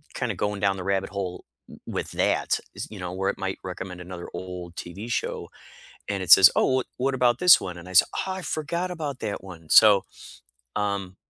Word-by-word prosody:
kinda - - -2
going 105 -1 -2
down 100 0 +1
the 90 - -6
rabbit 95 0 -1
hole 95 -3 -5 0.2
w - - -13
with - - -4
that, - - +1 0.2
is - - -5
you 105 - -9
know, 90 0 -5
where 95 +1 -1
it - - -3
might 95 0 -3
recommend 90 -1 -7
another 90 0 -8
old 90 -2 -7
TV 95 +7 -8
show, - - -3 0.6
and 100 -1 -2
it 90 - -7
says, 95 +1 +10
"Oh, - - +3
wha 130 - +1
what 135 +2 0
about 125 -1 +2
this 180 -1 +8
one?" 90 -2 -6
and 85 +1 -11
I - - -9
said, 90 - +6 0.2
"Oh, 190 - -2
I 190 - -6
forgot 170 +4 -3
about 150 -6 -4
that 105 -4 -4
one." 85 -4 -12
So, 105 -3 +7 0.7
um 100 -2 -2
95 Hz, 210 wpm, -25 LUFS, 90-115 Hz, 0.7 s, says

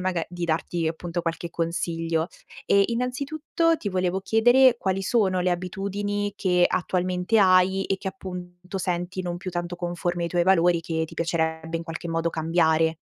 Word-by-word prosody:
mag 180 -2 -1
di 175 -1 -4
darti 165 0 -1
appunto 170 +1 -4
qualche 170 0 -3
consiglio. 165 0 -1 0.4
E 200 0 +5
innanzitutto, 280 +7 0
ti 220 - -4
volevo 185 0 0
chiedere 245 +5 +5
quali 190 0 -1
sono 190 -3 +2
le 180 - +1
abitudini 200 +3 -2
che 180 -3 +3
attualmente 180 +3 0
hai, 190 0 +4
e 195 - 0
che 190 - -4
appunto 180 -2 -7
senti 180 0 -2
non 175 -1 -3
più 185 +1 -6
tanto 175 0 -4
conformi 175 0 -2
ai - - -1
tuoi 175 0 +1
valori, 175 -2 +4
che 160 -1 -2
ti - - -13
piacerebbe 160 -1 -1
in 165 - -4
qualche 165 +1 -6
modo 165 0 0
cambiare. 160 0 +2
180 Hz, 165 wpm, -25 LUFS, 170-195 Hz, 0.4 s, E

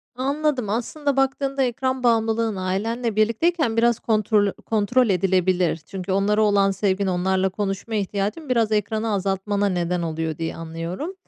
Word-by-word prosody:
Anladım. 270 -2 -1
Aslında 275 +6 -2
baktığında 270 0 +1
ekran 260 +1 -1
bağımlılığın 225 -2 +2
ailenle 210 +5 -2
birlikteyken 230 +4 +1
biraz 235 0 +3
kontrol 215 -2 +2
kontrol 225 +3 +2
edilebilir. 185 -2 +2
Çünkü 190 +1 -5
onlara 205 +2 +2
olan 200 -2 +3
sevgin, 195 0 0
onlarla 190 +1 +1
konuşma 200 +3 -3
ihtiyacın 205 - -2
biraz 230 -3 +2
ekranı 215 +1 0
azaltmana 200 +1 0
neden 180 -1 -1
oluyor 160 -1 -3
diye 165 -1 -3
anlıyorum. 165 - -5
210 Hz, 135 wpm, -23 LUFS, 190-235 Hz, -, biraz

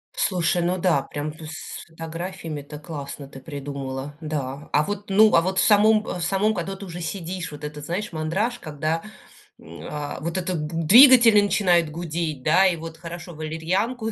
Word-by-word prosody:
Слушай, 175 -1 +1
ну 180 +2 0
да, 170 -6 +2
прям, 145 +2 -5
ну, 160 - -9
с 160 +4 -8
фотографиями- 165 -1 -6
это 150 +1 -10
классно 145 -3 -7
ты 135 -1 -11
придумала, 140 0 -6
да. 145 -2 -4
А 150 - +3
вот, 205 +4 -5
ну, 215 +2 +5
а - - +6
вот 185 +2 -2
в - - +4
самом 215 0 +5
в 180 - -5
самом, 195 +5 +1
когда 195 0 -4
ты 195 +1 -9
уже 175 -1 -7
сидишь, 175 -1 -5
вот 150 0 -10
этот, 150 0 -6
знаешь, 180 +6 -3
мандраж, 190 +10 -1
когда, 155 +2 -2 0.6
м, 85 +1 -12
а, 150 -1 -5
вот 170 +4 -3
этот 175 -4 -2
двигатели 230 - +7
начинают 180 -5 +2
гудеть, 160 -2 -4
да. 170 +7 +5
И 180 - +1
вот 165 0 -8
хорошо, 170 +1 -8
валерьянку 185 +10 -2
165 Hz, 180 wpm, -24 LUFS, 150-190 Hz, 0.6 s, двигатели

